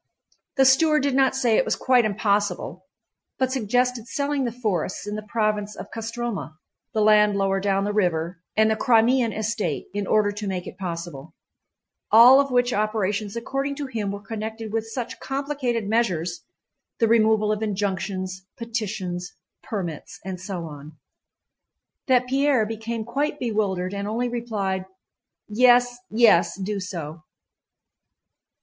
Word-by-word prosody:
The 270 - +5
steward 300 +3 +4
did 280 -1 +1
not 265 0 +3
say 240 -4 +2
it - - +4
was - - 0
quite 250 -2 +3
impossible, 200 -3 -1 0.5
but 260 -1 0
suggested 250 -1 0
selling 280 -1 -1
the 240 - -1
forests 205 -7 -2
in 210 0 -4
the 215 - -4
province 210 -2 -1
of - - -9
Kostromá, 225 - -4 0.4
the 215 - +1
land 210 -1 +5
lower 195 0 +1
down 195 0 +1
the 205 +1 -1
river, 175 -4 0 0.2
and 220 0 +4
the - - +2
Crimean 235 +1 +3
estate, 215 -7 -2
in 205 -1 -2
order 210 -1 +3
to 205 0 -5
make 185 -2 -3
it - - -10
possible: 165 -4 -6 0.8
all 245 +5 +9
of 280 0 +2
which 245 -1 +2
operations 210 0 -1
according 275 +4 -2
to 290 0 -4
him 225 -6 -3
were 200 0 -7
connected 220 0 -5
with 225 0 -1
such 240 +1 -5
complicated 270 -5 -2
measures—the 200 +1 -2
removal 220 -1 +3
of 215 0 -1
injunctions, 190 -2 -2
petitions, 210 -7 -4 0.3
permits, 175 -8 -5
and 185 -2 -5
so 185 -3 -5
on—that 155 - -6
Pierre 270 -2 +2
became 225 +1 -4
quite 285 +5 -1
bewildered 200 -7 -1
and 200 0 -3
only 240 +3 -1
replied: 205 -6 -2 0.6
"Yes, 245 +2 +4
yes, 215 -6 +4
do 200 +1 -3
so." 170 -4 -6
215 Hz, 140 wpm, -24 LUFS, 195-240 Hz, 0.8 s, all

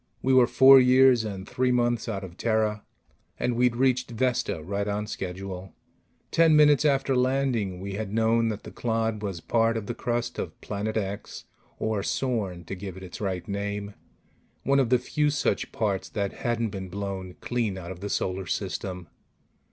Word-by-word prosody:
We 130 - +3
were 125 -2 +6
four 130 +2 +8
years 130 -1 +5
and 95 -3 -6
three 130 0 +1
months 120 -1 +1
out 100 -2 -3
of 90 -2 -9
Terra, 110 -1 0 0.6
and 120 - 0
we'd 125 0 +2
reached 130 0 +1
Vesta 120 -8 -1
right 100 +4 -2
on 105 +1 -1
schedule. 95 -2 -6 0.6
Ten 165 -1 +5
minutes 150 0 +5
after 135 -2 +2
landing, 125 -7 0
we 100 +1 -5
had 100 0 -4
known 115 +1 +2
that 110 -2 -3
the - - -9
clod 115 -2 -1
was 95 -5 -4
part 115 +2 +1
of 110 - -4
the 120 - -3
crust 120 +1 -2
of - - -5
Planet 105 +2 -3
X 100 -1 -4 0.3
or 110 -2 -1
Sorn, 100 -7 -2
to - - -6
give 95 -1 -7
it 95 - -9
its 90 +2 -9
right 95 -3 -3
name 100 0 -3 0.7
one 140 +1 +3
of 130 -4 +2
the 125 - +5
few 150 +4 0
such 145 -2 -1
parts 100 -4 -1
that 100 -2 -2
hadn't 115 -1 0
been 95 -2 -6
blown 95 -1 -5
clean 115 -6 -2
out 90 -1 -7
of 90 - -8
the 100 +2 -5
Solar 95 -1 -2
System. 90 +1 -4
110 Hz, 180 wpm, -26 LUFS, 95-125 Hz, 0.7 s, four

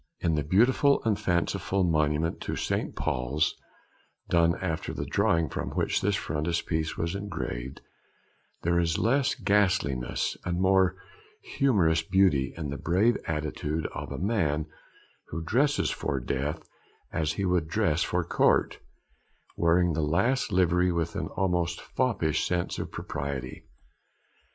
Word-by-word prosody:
In 85 - +1
the 75 - +1
beautiful 125 - +3
and 110 -3 +1
fanciful 90 +2 0
monument 80 -1 0
in - - -1
St. - - -2
Paul's 65 +5 0 0.8
done 85 0 +3
after 80 -4 -3
the - - -3
drawing 85 -1 +2
from - - -4
which - - 0
this 100 0 +1
frontispiece 80 -1 -2
was 85 +1 -1
engraved, 80 -10 -5 0.8
there 85 +1 +2
is 85 -2 +1
less 130 +4 +2
ghastliness 100 - +1
and 85 -1 -2
a - - -2
more 95 -1 +3 0.6
harmonious 90 -12 +3
beauty 80 -6 +2
in 75 -4 -4
the 70 - -5
brave 100 +9 +2
attitude 75 0 -2
of - - -6
a - - -4
man 80 -7 0 0.6
who 80 +2 -5
dresses 140 - +1
for 70 - -2
death 70 +5 -3 0.5
as 80 -1 0
he 100 - -2
would 90 -3 +1
dress 85 -3 +1
for 90 -1 0
Court, 85 - +2 0.8
wearing 85 +1 +3
the 80 - -1
last 105 - +1
livery 90 -1 +3
with 85 +1 -2
an 90 -5 -2
almost 90 -3 0
foppish 100 - 0
sense 90 -1 -1
of - - -5
propriety. 70 -2 -5
85 Hz, 135 wpm, -28 LUFS, 80-95 Hz, 0.8 s, beautiful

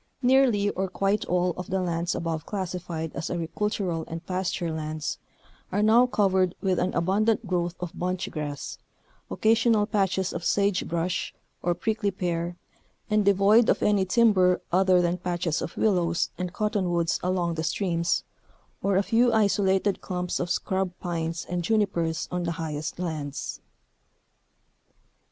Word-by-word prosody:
Nearly, 245 -6 +4
or 190 0 -2
quite 195 +3 0
all, 180 0 +1
of 180 - -6
the 190 - 0
lands 170 -1 -1
above 165 -2 -2
classified 180 -5 -4
as 165 - -3
agricultural 175 0 -2
and 165 +1 -7
pasture 180 -2 -2
lands, 155 -1 -4 0.5
are 205 +3 +1
now 230 +4 +6
covered 190 -5 +2
with 185 -2 0
an 180 +1 0
abundant 210 +5 +1
growth 175 -2 -1
of 180 -2 -4
bunch 180 0 -2
grass, 145 -2 -5 0.5
occasional 225 -1 +3
patches 195 -3 0
of 170 - -4
sage 200 0 +1
brush 170 +1 -2 0.3
or 175 0 0
prickly 220 0 -1
pear, 175 -2 -3 0.5
and 210 0 +3
devoid 200 +4 +5
of - - +2
any 205 -2 +3
timber 190 -3 +4
other 185 0 +4
than 175 +1 0
patches 175 -2 -1
of - - -6
willows 175 -5 +1
and 180 -1 -4
cot 210 +3 -1
tonwoods 175 -5 +1
along 180 -2 0
the 160 -1 -3
streams, 170 0 0 0.6
or 195 -1 +2
a 195 - +3
few 235 +3 +3
isolated 200 -2 +2
clumps 180 -1 -3
of 175 - -2
scrub 190 +1 0
pines 165 -2 -3
and 175 0 -2
junipers 170 -6 0
on 180 0 -1
the 170 -1 -1
highest 155 -2 -4
lands. 155 -5 -4
180 Hz, 145 wpm, -26 LUFS, 170-200 Hz, 0.6 s, now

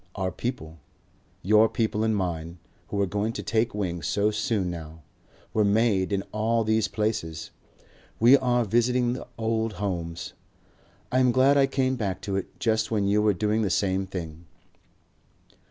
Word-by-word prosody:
Our 95 -2 -2
people, 85 -8 -5 0.6
your 110 +4 +5
people 110 -1 -1
and 110 -1 +1
mine, 85 -3 -3 0.3
who 100 - -3
are - - +2
going 105 +4 -2
to - - -5
take 115 0 0
wing 90 -4 -2
so 100 +7 +1
soon 105 -4 -1
now, 80 -2 -9 0.5
were 110 - +3
made 100 -2 +2
in 100 -1 0
all 115 +2 +1
these 110 0 +1
places. 105 -8 -3 0.7
We 120 +4 +7
are 125 -3 +2
visiting 120 +3 +2
the 125 - -7
old 110 -1 -1
homes. 85 -3 -4 0.8
I 130 - +2
am 125 -1 +4
glad 130 +3 +4
I 140 -1 +4
came 130 -1 0
back 100 -5 -2
to 100 - -3
it 95 - -5
just 110 -2 +1
when 105 -3 0
you 105 +1 +3
were 105 -1 +3
doing 105 +3 0
the 105 - 0
same 95 +1 0
thing." 85 -3 -7
105 Hz, 165 wpm, -26 LUFS, 95-115 Hz, 0.8 s, We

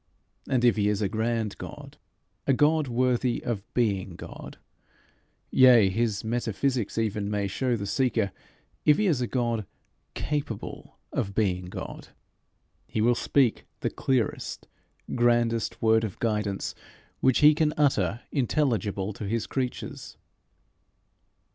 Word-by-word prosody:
And 125 -2 +2
if 120 -2 +4
he 105 -1 +2
is 105 0 0
a - - +2
grand 110 0 -1
God, - - -9 0.5
a 135 - +5
God 150 +2 +3
worthy 125 0 +1
of 110 -4 -4
being 100 -7 0
God, - - -9 0.9
yea 120 -7 +7
(his 110 0 0
metaphysics 120 +1 -1
even 105 -2 -1
may 105 -1 0
show 125 +6 0
the 100 -3 -4
seeker), 115 -3 +1 0.5
if 150 0 +5
he 215 - +1
is 155 -10 +2
a 120 - 0
God 115 -5 -1 0.5
capable 145 -7 -4 0.2
of 100 -1 -2
being 90 -4 +1
God, 90 - -7 0.8
he - - -3
will 120 +3 +4
speak 125 0 +1 0.2
the - - -1
clearest 130 -5 -1 0.5
grandest 120 -2 +1
word 110 0 +4
of 105 -4 -4
guidance 105 -3 -1 0.5
which 130 -3 +3
he 150 +1 +8
can 155 0 +2
utter 115 - +2
intelligible 115 -7 0
to 100 +1 -6
his 115 +2 -1
creatures. 130 -2 -4
115 Hz, 130 wpm, -27 LUFS, 105-130 Hz, 0.9 s, he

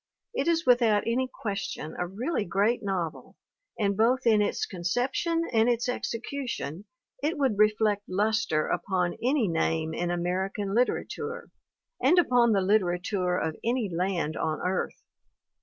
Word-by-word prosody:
It 470 - -1
is 335 0 +2
without 235 -4 +4
any 255 +3 0
question 200 -9 -4
a 180 - -1
really 225 - -2
great 205 +6 +1
novel 170 - -4 0.4
and 200 -2 +1
both 245 +5 +2
in 220 -3 +5
its 205 - 0
conception 245 - -1
and 225 +1 +4
its 240 0 +1
execu 250 +2 -3
tion 160 +2 -5 0.4
it 300 +3 -1
would 260 -8 +1
reflect 215 -1 +2
luster 205 -4 +1
upon 180 -3 -1
any 250 -1 +2
name 160 -1 0
in 175 +2 -2
American 190 +3 -2
literature 445 - -1 0.5
and 360 - +4
upon 245 -8 +4
the 200 -2 +3
literature 185 -1 +1
of 160 -3 -2
any 235 -4 0
land 175 -3 -1
on 155 -1 -1
earth. 185 +1 -2
210 Hz, 140 wpm, -27 LUFS, 180-245 Hz, 0.5 s, in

